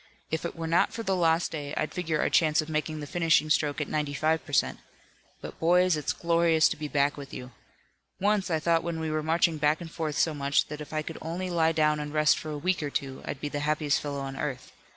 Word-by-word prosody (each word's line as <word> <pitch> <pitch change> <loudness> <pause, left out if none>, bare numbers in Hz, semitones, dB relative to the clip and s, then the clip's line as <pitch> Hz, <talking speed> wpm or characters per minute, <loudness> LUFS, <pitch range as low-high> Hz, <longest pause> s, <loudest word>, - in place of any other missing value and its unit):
If 160 +1 -2
it 170 - -4
were 165 -1 -5
not 165 +2 +2
for 230 - -5
the 195 -3 0
lost 165 -1 +2
day 145 -2 -5
I'd 155 - -2
figure 165 -4 -1
our - - +1
chance 155 -2 +3
of 155 0 -1
making 155 0 -2
the - - -5
finishing 160 0 +2
stroke 150 -1 +1
at 150 - -2
ninety 150 -2 -2
five 155 +2 +1
per 145 - -12
cent. - - +1 0.6
But - - -9
boys, 180 +1 +4
it's 150 - -1
glorious 170 -1 +3
to - - -2
be 150 0 -5
back 145 0 +1
with 140 -2 -9
you. 125 0 -8 0.7
Once, 200 -1 +1
I 160 - +2
thought 165 +1 +2
when 170 -1 -3
we 160 -1 -2
were 155 0 0
marching 165 +1 +1
back 150 +1 +2
and 170 -2 -8
forth 155 -3 -3
so 160 - +2
much 140 -1 +1
that 150 0 -6
if 150 - -9
I 155 0 -1
could - - -7
only 175 +3 -4
lie 165 -1 +3
down 150 -1 +2
and 150 0 -5
rest 150 0 +3
for 155 - -7
a 150 - -4
week 180 +4 0
or 145 - -2
two 135 -1 -4
I'd 135 - -5
be 150 - -2
the 145 - -3
happiest 150 -1 +1
fellow 140 -1 -4
on 135 0 -5
earth. 135 -2 -4
155 Hz, 255 wpm, -28 LUFS, 150-165 Hz, 0.7 s, boys